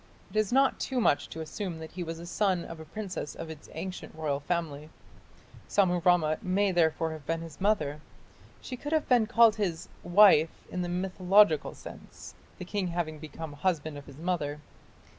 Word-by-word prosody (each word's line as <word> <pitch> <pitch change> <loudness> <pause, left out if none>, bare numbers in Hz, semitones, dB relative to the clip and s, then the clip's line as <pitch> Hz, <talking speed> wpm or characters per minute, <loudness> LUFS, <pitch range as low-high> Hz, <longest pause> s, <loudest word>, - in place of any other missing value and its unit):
It - - -15
is 215 -2 +1
not 270 +2 +3
too 260 -2 -1
much 145 -10 +2
to 160 - -6
assume 170 +2 -5
that 160 0 -9
he 180 - -6
was 165 -1 -4
a 170 - -9
son 185 -1 0
of 165 - -8
a 160 - -9
princess 190 -2 -5
of 165 -1 -7
its 155 -2 -12
ancient 180 +2 -6
royal 150 -3 -1
family. 155 -1 -3 0.8
Sammurammat 175 -4 +3
may 195 +2 +1
therefore 165 -2 +2
have 155 -2 -8
been 165 0 -1
his 165 0 -10
mother. 155 -8 +1 0.6
She 255 - -6
could 290 +5 -5
have 315 -1 +1
been 240 -4 +4
called 230 -1 +5
his 180 -6 -2
"wife" 175 -4 +5
in 180 - -2
the 175 - -2
mythological 185 -1 +3
sense, - - -11 0.2
the 180 - -7
king 195 0 -2
having 170 -3 -3
become 155 0 -8
"husband 155 0 -1
of 145 -1 -10
his 140 -2 -12
mother". 155 -3 -2
175 Hz, 180 wpm, -29 LUFS, 155-195 Hz, 0.8 s, called